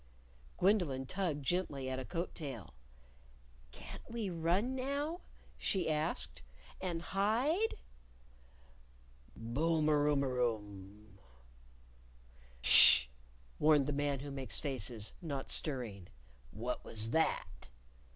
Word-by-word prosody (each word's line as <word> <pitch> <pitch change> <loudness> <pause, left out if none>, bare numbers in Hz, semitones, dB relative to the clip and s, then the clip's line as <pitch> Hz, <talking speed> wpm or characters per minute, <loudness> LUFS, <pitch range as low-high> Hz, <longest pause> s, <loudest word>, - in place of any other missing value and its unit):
Gwendolyn 175 -10 +2
tugged 155 -4 -2
gently 145 -6 -1
at 130 0 -2
a 130 - -5
coat 175 +3 -4
tail. 120 - -7 1.0
"Can't - - -10
we 225 -4 -3
run 175 +9 +1
now?" 280 +6 -2 0.4
she 185 -5 +1
asked; 150 - -2 0.4
"and 175 -3 -3
hide?" 245 - +1 1.6
Boom 150 +7 0
er 145 -1 +3
oom 145 -2 +2
er 130 -2 -1
oom! 105 -3 -4 1.4
"Sh!" 65 +1 +8 0.5
warned 150 -2 +5
the 145 - -1
Man 140 -1 -1
Who 145 0 -6
Makes 135 -2 -3
Faces, 120 -6 -2
not 140 -6 -4
stirring. 115 - -3 0.4
"What 120 - -4
was 110 0 -1
that!" 160 - -1
145 Hz, 105 wpm, -34 LUFS, 120-180 Hz, 1.6 s, Sh